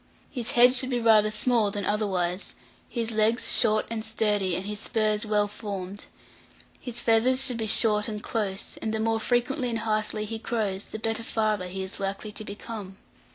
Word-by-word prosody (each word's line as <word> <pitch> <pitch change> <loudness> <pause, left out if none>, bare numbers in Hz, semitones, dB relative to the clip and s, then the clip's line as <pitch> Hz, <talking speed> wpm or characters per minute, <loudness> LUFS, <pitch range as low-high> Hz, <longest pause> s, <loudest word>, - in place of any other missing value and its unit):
His 245 -4 -3
head 245 +1 +7
should 255 0 +1
be 245 -2 0
rather 220 -2 +5
small 215 0 +2
than 200 -1 -3
otherwise, 190 -4 -1 0.3
his 230 -2 -2
legs 220 +2 +2
short 215 -2 +3
and 225 -1 -3
sturdy, 210 -4 +1
and 185 - -4
his 210 0 -4
spurs 215 -1 0
well 210 -1 +2
formed; 200 -2 -6 0.7
his 240 -2 -5
feathers 245 +3 +3
should 250 -3 0
be 220 -1 -2
short 210 -1 +3
and 210 -2 -5
close, 205 -4 -3
and 220 0 -2
the - - -1
more 225 0 +1
frequently 245 +2 0
and 230 - -1
heartily 215 -1 -1
he 225 +1 -5
crows, 210 -4 -2
the - - -7
better 225 +1 -1
father 215 -4 -1
he 190 +1 -4
is 190 - -5
likely 195 +2 -4
to 215 - -6
become. 205 -2 -7
215 Hz, 185 wpm, -27 LUFS, 205-230 Hz, 0.7 s, head